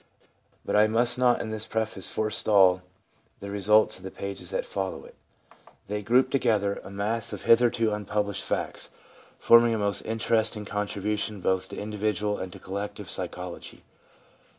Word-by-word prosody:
But - - -1
I 105 +1 +6
must 120 +3 +4
not 125 -1 +3
in 110 - -5
this 110 0 -3
preface 110 -3 -2
forestall 100 -4 +3 0.6
the 100 0 -7
results 105 +2 +3
of 95 - -12
the 95 - -5
pages 95 -2 -6
that - - -2
follow 95 -1 -4
it. - - -14 0.8
They 105 0 -2
group 125 +5 +3
together 110 -7 +2
a - - -1
x - - -8
PREFACE 100 - -11
mass 110 +2 -2
of 100 - -6
hitherto 115 -1 +4
unpublished 105 -1 -2
facts, - - -3 0.5
forming 115 0 +5
a - - -1
most 100 -2 0
interesting 110 -1 0
contribution 105 +1 -3
both 95 0 0
to - - -8
individual 105 0 -2
and 95 - -5
to - - -10
collective 100 0 -6
psychology. 90 -1 -7
105 Hz, 160 wpm, -26 LUFS, 100-110 Hz, 0.8 s, I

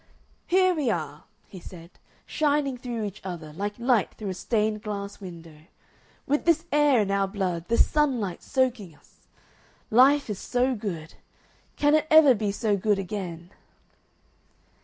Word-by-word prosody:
"Here 370 0 +3
we 300 -7 -1
are," 155 -6 -4 0.2
he 190 - -11
said, 170 -1 -12 0.3
"shining 290 -3 0
through 240 -2 -5
each 205 0 -6
other 170 -5 -7
like 205 +5 -4
light 240 -3 +1
through 210 -3 -6
a - - -2
stained 215 +2 -1
glass 200 -2 -6
window. 165 -5 -11 0.6
With 290 +2 0
this 335 -1 +2
air 290 -5 +4
in 200 -1 -1
our 195 0 +1
blood, 185 -4 -3
this 230 - +4
sunlight 255 - 0
soaking 245 - -1
us.... - - -28 0.6
Life 275 +5 +5
is 210 -4 -4
so 255 +1 0
good. 180 -8 -6 0.6
Can 290 0 +2
it 310 0 +2
ever 310 -4 +7
be 210 -3 -2
so 210 0 0
good 205 +1 +1
again?" 180 -3 -6
210 Hz, 150 wpm, -26 LUFS, 185-265 Hz, 0.6 s, ever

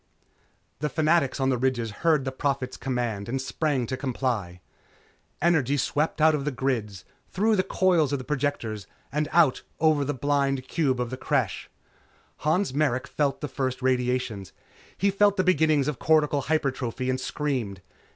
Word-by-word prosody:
The 150 +1 -1
fanatics 155 -1 +2
on 135 0 +2
the 125 -2 +1
ridges 120 -3 0
heard 155 -5 +3
the 130 - -2
Prophet's 130 -1 -2
command 120 -6 -3
and 135 +2 -1
sprang 135 -1 -1
to 130 - -3
comply. 120 -9 -2 0.8
Energy 150 -5 +3
swept 150 +4 0
out 155 +1 +5
of 145 -2 -1
the 150 - 0
grids, 120 -8 -2 0.2
through 215 +3 +2
the 190 - +3
coils 180 -6 +2
of 140 - +1
the 130 - -8
projectors 130 -8 -2 0.2
and 150 +2 -1
out 165 -6 +4 0.2
over 155 -3 +3
the 145 +1 -2
blind 135 -1 0
cube 135 -5 0
of 125 0 -2
the 130 - -4
Creche. 130 - -1 0.7
Han 160 +7 +1
Merrick 135 -3 +1
felt 145 -2 -1
the 150 - -2
first 130 -2 -3
radiations. 125 -6 -1 0.4
He 200 0 +2
felt 205 +1 +3
the 185 - +3
beginnings 155 -5 +3
of 150 -5 -2
cortical 150 -2 +3
hypertrophy 130 -4 -1
and 130 0 0
screamed. 125 -12 -3
135 Hz, 160 wpm, -26 LUFS, 125-155 Hz, 0.8 s, out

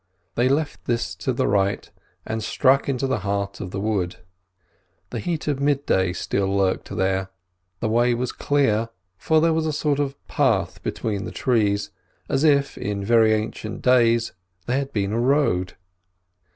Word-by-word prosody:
They 125 +2 +2
left 145 +2 -1
this 115 -6 -1
to 90 +9 -1
the 120 - 0
right 100 0 +1 0.4
and 110 0 -3
struck 135 +5 +2
into 135 0 0
the 130 -4 0
heart 100 0 -3
of 90 - -5
the 95 - -4
wood. 100 -4 -1 1.0
The - - -3
heat 170 -4 -3
of 145 -2 0
midday 140 -10 +1
still 95 +1 -1
lurked 95 -1 0
here; 95 0 -1 0.5
the 115 - 0
way 120 +2 +3
was 125 +1 -2
clear, 115 -6 +1 0.3
for 155 - +2
there 165 +1 +3
was 160 0 0
a - - 0
sort 150 -1 0
of 140 -1 -2
path - - +1
between 105 -3 -3
the - - -6
trees, 105 -5 +1 0.4
as 135 - 0
if, 140 -3 +3
in 100 -1 -3
very 115 0 +5
ancient 110 0 -5
days, 115 -2 +3 0.3
there 125 +2 0
had 140 0 -4
been 100 -3 -1
a 115 - 0
road. 120 -9 +1
115 Hz, 165 wpm, -23 LUFS, 100-140 Hz, 1.0 s, very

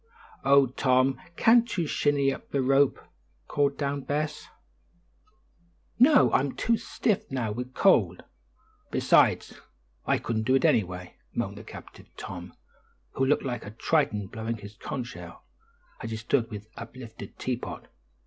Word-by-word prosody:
"Oh, 140 0 +6
Tom, 130 0 +1
can't 230 0 +4
you 170 - +1
shinny 145 -2 +1
up - - -11
the 140 -2 0
rope?" 135 +1 +3 0.5
called 140 -1 +1
down 140 -1 -2
Bess. 150 +2 -3 1.5
"No. 275 +3 +6
I'm 135 +1 +2
too 230 - +2
stiff 215 -2 -1
now 125 -5 -2
with 125 +4 -6
cold; 100 - +3 0.7
besides, - - +2 0.5
I - - +3
couldn't 110 -2 -2
do 130 - +4
it 135 - +2
anyway," 90 -3 0 0.2
moaned - - -3
the - - -10
captive - - -12
Tom, 90 -1 -8 0.6
who 135 - 0
looked 145 - +2
like 120 -3 -3
a - - -8
Triton 110 -2 0
blowing 110 +3 -5
on 100 - -11
a - - -7
conch 125 -3 -4
shell, 125 - -11 0.6
as - - -5
he 110 - -4
stood 115 +1 0
with 105 0 -8
uplifted 115 -3 -10
teapot. 125 -1 -4
130 Hz, 145 wpm, -27 LUFS, 110-140 Hz, 1.5 s, Oh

